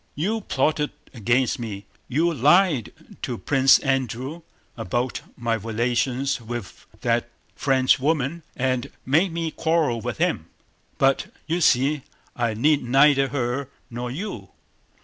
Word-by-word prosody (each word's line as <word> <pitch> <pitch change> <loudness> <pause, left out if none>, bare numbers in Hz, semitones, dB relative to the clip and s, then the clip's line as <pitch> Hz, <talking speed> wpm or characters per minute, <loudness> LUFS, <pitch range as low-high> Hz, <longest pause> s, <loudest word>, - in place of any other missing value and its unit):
You 210 +9 -1
plotted 150 -2 0 0.2
against 120 +2 +1
me, 105 -4 -6 0.2
you 165 +6 +1
lied 150 - +3 0.3
to - - -3
Prince 135 +7 +5
Andrew 135 +3 -2 0.3
about 120 +3 -2 0.2
my 115 -1 -1
relations 120 +5 -1
with 115 -2 -7
that - - 0 0.3
Frenchwoman 135 +4 +2
and 130 -2 -1 0.2
made 160 +8 +3
me 165 -1 -2
quarrel 160 -9 +1
with - - -4
him, - - 0 0.5
but 135 0 +2 0.2
you 170 +2 -1
see 140 +1 +3 0.3
I 120 -3 0
need 145 +6 +3
neither 135 +2 +4
her 130 0 -2 0.2
nor 120 +1 -4
you!" 135 - -6
135 Hz, 120 wpm, -24 LUFS, 120-150 Hz, 0.5 s, Prince